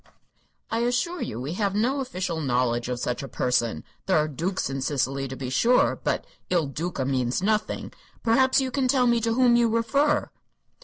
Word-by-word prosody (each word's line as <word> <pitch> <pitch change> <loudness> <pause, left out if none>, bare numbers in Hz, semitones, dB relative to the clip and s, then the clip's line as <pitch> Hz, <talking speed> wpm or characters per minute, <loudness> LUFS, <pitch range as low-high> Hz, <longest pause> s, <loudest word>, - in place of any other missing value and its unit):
"I 230 - 0
assure 250 +9 0
you 110 - -4
we 135 +6 -4
have 200 0 -1
no 250 +7 +1
official 185 -10 -3
knowledge 125 -3 0
of 125 -1 -2
such 125 0 -2
a 135 - -6
person. 125 -3 0 0.2
There 190 - +3
are 155 0 +2
dukes 170 +6 -2
in 135 0 -4
Sicily, 135 0 -1
to 130 - -6
be 130 -1 -5
sure; 235 - +3
but - - -1 0.2
'Il 175 -4 +2
Duca' 145 0 -3
means 130 +3 0
nothing. 215 +1 -1 0.3
Perhaps 260 +4 +4
you 260 -1 -1
can 265 0 0
tell 255 -1 +3
me 235 -1 +3
to 230 0 +1
whom 250 -1 +5
you 235 -1 +4
refer?" 275 +7 +1
185 Hz, 190 wpm, -25 LUFS, -, 0.3 s, whom